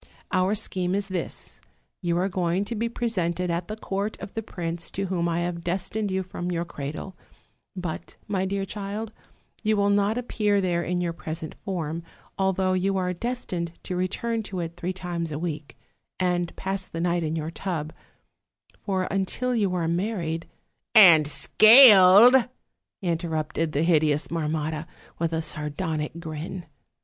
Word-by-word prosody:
Our 185 Hz, +3 st, +2 dB
scheme 185 Hz, -2 st, -1 dB
is 200 Hz, 0 st, -2 dB
this: 185 Hz, -2 st, -5 dB, 0.4 s
you 170 Hz, -2 st, 0 dB
are 185 Hz, +2 st, +1 dB
going 185 Hz, 0 st, 0 dB
to 235 Hz, -, -4 dB
be 230 Hz, +1 st, -1 dB
presented 180 Hz, -7 st, -1 dB
at 170 Hz, +1 st, -2 dB
the 215 Hz, -, -4 dB
court 205 Hz, 0 st, -3 dB
of -, -, -8 dB
the 225 Hz, -, -2 dB
prince 170 Hz, -4 st, -5 dB
to 195 Hz, -, -3 dB
whom 175 Hz, -2 st, -1 dB
I 170 Hz, +1 st, 0 dB
have 175 Hz, -1 st, -3 dB
destined 195 Hz, +4 st, -2 dB
you 190 Hz, 0 st, -1 dB
from 180 Hz, -1 st, -5 dB
your 170 Hz, -1 st, -1 dB
cradle; 155 Hz, +4 st, -6 dB, 0.6 s
but, 180 Hz, -4 st, -5 dB
my 190 Hz, -2 st, 0 dB
dear 195 Hz, 0 st, -2 dB
child, 205 Hz, +2 st, -5 dB, 0.5 s
you 215 Hz, -1 st, +1 dB
will 200 Hz, 0 st, +3 dB
not 205 Hz, +2 st, +2 dB
appear 210 Hz, -4 st, +1 dB
there 175 Hz, -3 st, 0 dB
in 180 Hz, +1 st, -1 dB
your 170 Hz, -1 st, -1 dB
present 160 Hz, -1 st, -6 dB
form, 170 Hz, -5 st, -3 dB, 0.3 s
although 190 Hz, -1 st, +1 dB
you 190 Hz, +1 st, +1 dB
are 180 Hz, -1 st, 0 dB
destined 180 Hz, -6 st, -4 dB
to 180 Hz, -, -4 dB
return 220 Hz, +6 st, -1 dB
to 195 Hz, -3 st, -6 dB
it 170 Hz, -1 st, -4 dB
three 175 Hz, +1 st, -3 dB
times 175 Hz, -3 st, -4 dB
a 145 Hz, -, -3 dB
week, 155 Hz, -3 st, -5 dB, 0.4 s
and 175 Hz, -2 st, 0 dB
pass 190 Hz, -1 st, -4 dB
the 165 Hz, -, -6 dB
night 175 Hz, 0 st, +1 dB
in 160 Hz, 0 st, -2 dB
your 160 Hz, 0 st, -3 dB
tub; 165 Hz, -4 st, -4 dB, 0.9 s
for, 190 Hz, -2 st, 0 dB
until 220 Hz, +6 st, -1 dB
you 200 Hz, -5 st, +1 dB
are 170 Hz, -2 st, 0 dB
married 170 Hz, -2 st, -2 dB, 0.2 s
' -, -, -50 dB
" -, -, -49 dB
'And 170 Hz, -8 st, +8 dB
scaled,' 220 Hz, -, +8 dB, 0.5 s
interrupted 165 Hz, -2 st, -1 dB
the 145 Hz, -, +1 dB
hideous 155 Hz, -3 st, +2 dB
Marmotta, 155 Hz, -1 st, -2 dB, 0.3 s
with 165 Hz, 0 st, 0 dB
a 160 Hz, 0 st, -1 dB
sardonic 150 Hz, +1 st, -3 dB
grin. 165 Hz, +2 st, -6 dB
180 Hz, 165 wpm, -25 LUFS, 165-195 Hz, 0.9 s, And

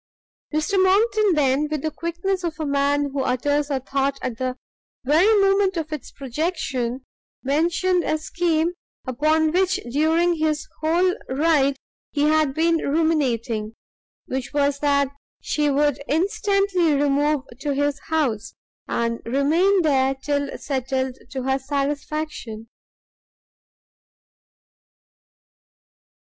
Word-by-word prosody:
Mr 310 Hz, +6 st, +1 dB
Monckton 415 Hz, 0 st, +3 dB
then, 285 Hz, 0 st, +2 dB
with 305 Hz, -2 st, -3 dB
the 315 Hz, -, -1 dB
quickness 345 Hz, +4 st, -3 dB
of 330 Hz, -2 st, -3 dB
a 310 Hz, -, -2 dB
man 285 Hz, 0 st, +1 dB
who 275 Hz, 0 st, -2 dB
utters 285 Hz, +3 st, 0 dB
a 275 Hz, -2 st, 0 dB
thought 275 Hz, +1 st, -1 dB
at 245 Hz, -3 st, -4 dB
the 255 Hz, 0 st, -2 dB, 0.5 s
very 325 Hz, -, +4 dB
moment 390 Hz, -1 st, +3 dB
of 315 Hz, -1 st, -3 dB
its 295 Hz, -4 st, -6 dB
projection, 265 Hz, -3 st, -3 dB, 0.4 s
mentioned 340 Hz, +6 st, +1 dB
a 310 Hz, -, 0 dB
scheme 330 Hz, +1 st, 0 dB, 0.3 s
upon 310 Hz, +5 st, +2 dB
which 370 Hz, +2 st, +2 dB, 0.2 s
during 325 Hz, +5 st, +2 dB
his 310 Hz, -1 st, -1 dB
whole 345 Hz, +4 st, +2 dB, 0.2 s
ride 280 Hz, 0 st, +2 dB, 0.4 s
he 290 Hz, -, 0 dB
had 305 Hz, -1 st, +3 dB
been 330 Hz, +1 st, +3 dB
ruminating; 255 Hz, -9 st, 0 dB, 0.5 s
which 260 Hz, -1 st, -4 dB
was 285 Hz, -1 st, +1 dB
that 280 Hz, -1 st, +2 dB, 0.3 s
she 295 Hz, -1 st, 0 dB
would 285 Hz, 0 st, +1 dB
instantly 395 Hz, -, +1 dB
remove 290 Hz, 0 st, +1 dB, 0.2 s
to 285 Hz, -1 st, -2 dB
his 285 Hz, 0 st, 0 dB
house, 235 Hz, -9 st, -1 dB, 0.3 s
and 230 Hz, 0 st, -1 dB
remain 330 Hz, +10 st, +2 dB
there 270 Hz, -3 st, +2 dB
till 285 Hz, +1 st, -2 dB
settled 265 Hz, -1 st, -2 dB
to 260 Hz, 0 st, -4 dB
her 265 Hz, +1 st, +1 dB
satisfaction. 285 Hz, -4 st, -3 dB
295 Hz, 115 wpm, -23 LUFS, 270-330 Hz, 0.5 s, very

